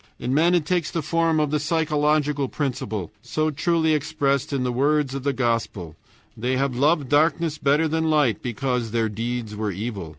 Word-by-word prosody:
In 125 Hz, +2 st, -2 dB
men 170 Hz, +5 st, +4 dB
it 170 Hz, -4 st, +1 dB
takes 175 Hz, -1 st, 0 dB
the 165 Hz, -, -3 dB
form 165 Hz, 0 st, +1 dB
of 150 Hz, -2 st, 0 dB
the 150 Hz, -, +1 dB
psychological 150 Hz, -2 st, +1 dB
principle, 110 Hz, -, -3 dB
so 155 Hz, +6 st, -1 dB
truly 160 Hz, +1 st, +1 dB
expressed 140 Hz, -2 st, 0 dB
in 135 Hz, -2 st, -1 dB
the 125 Hz, -, 0 dB
words 140 Hz, +2 st, +1 dB
of 135 Hz, -, -4 dB
the 140 Hz, +2 st, 0 dB
Gospel, 115 Hz, -, -2 dB, 0.4 s
"They 125 Hz, +3 st, -1 dB
have 135 Hz, -1 st, 0 dB
loved 145 Hz, +2 st, +2 dB
darkness 155 Hz, +2 st, +2 dB
better 145 Hz, +3 st, +2 dB
than 160 Hz, +1 st, 0 dB
light 145 Hz, -9 st, +2 dB
because 125 Hz, 0 st, -2 dB
their 115 Hz, 0 st, 0 dB
deeds 115 Hz, 0 st, -4 dB
were 105 Hz, 0 st, -2 dB
evil." 100 Hz, -3 st, -5 dB
140 Hz, 185 wpm, -23 LUFS, 120-155 Hz, 0.4 s, men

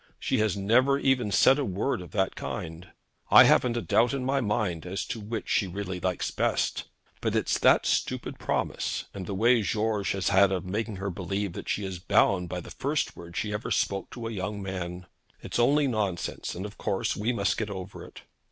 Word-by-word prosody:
She -, -, 0 dB
has 105 Hz, -3 st, +1 dB
never 125 Hz, +8 st, +3 dB
even 130 Hz, -6 st, +1 dB
said 130 Hz, +8 st, +5 dB
a -, -, +1 dB
word 100 Hz, +1 st, -1 dB
of 90 Hz, -, -9 dB
that 95 Hz, -2 st, 0 dB
kind. 80 Hz, +3 st, -6 dB, 0.4 s
I -, -, +10 dB
haven't 120 Hz, -1 st, +4 dB
a 120 Hz, -, -2 dB
doubt 120 Hz, +4 st, +3 dB
on 130 Hz, -2 st, -3 dB
my 135 Hz, +1 st, +1 dB
mind 105 Hz, -7 st, -1 dB
as 90 Hz, +2 st, -4 dB
to 115 Hz, -, -5 dB
which 110 Hz, +1 st, -5 dB
she 100 Hz, -, +1 dB
really 95 Hz, 0 st, -4 dB
likes 90 Hz, 0 st, -1 dB
best; -, -, 0 dB, 0.4 s
but -, -, -1 dB
it's -, -, +1 dB
that -, -, +5 dB
stupid -, -, -1 dB
promise, -, -, -2 dB
and 95 Hz, -2 st, -6 dB
the 100 Hz, -, -3 dB
way 115 Hz, +3 st, +4 dB
that 100 Hz, -, -3 dB
George 105 Hz, -3 st, 0 dB
has 95 Hz, -1 st, 0 dB
had 100 Hz, 0 st, +5 dB
of 95 Hz, -1 st, -2 dB
making 110 Hz, +3 st, -3 dB
her 95 Hz, +1 st, -3 dB
believe 95 Hz, +1 st, -3 dB
that -, -, -7 dB
she 105 Hz, -, -1 dB
is 95 Hz, -2 st, -5 dB
bound 95 Hz, -2 st, +2 dB
by 90 Hz, 0 st, -4 dB
the -, -, -11 dB
first 145 Hz, +2 st, -1 dB
word 85 Hz, 0 st, -10 dB
she 105 Hz, -1 st, -2 dB
ever 105 Hz, -, -3 dB
spoke 100 Hz, -1 st, 0 dB
to 120 Hz, -2 st, -7 dB
a 115 Hz, -, -3 dB
young 100 Hz, 0 st, -4 dB
man. 90 Hz, -2 st, -5 dB, 0.4 s
It's -, -, -3 dB
only 145 Hz, +5 st, +4 dB
nonsense, 105 Hz, -8 st, -2 dB
and 95 Hz, +3 st, -5 dB
of 105 Hz, -, -9 dB
course 95 Hz, -, -1 dB
we 110 Hz, +4 st, 0 dB
must 100 Hz, -5 st, 0 dB
get 110 Hz, -1 st, -2 dB
over 95 Hz, -1 st, -7 dB
it.' -, -, -13 dB
100 Hz, 215 wpm, -27 LUFS, 95-115 Hz, 0.4 s, I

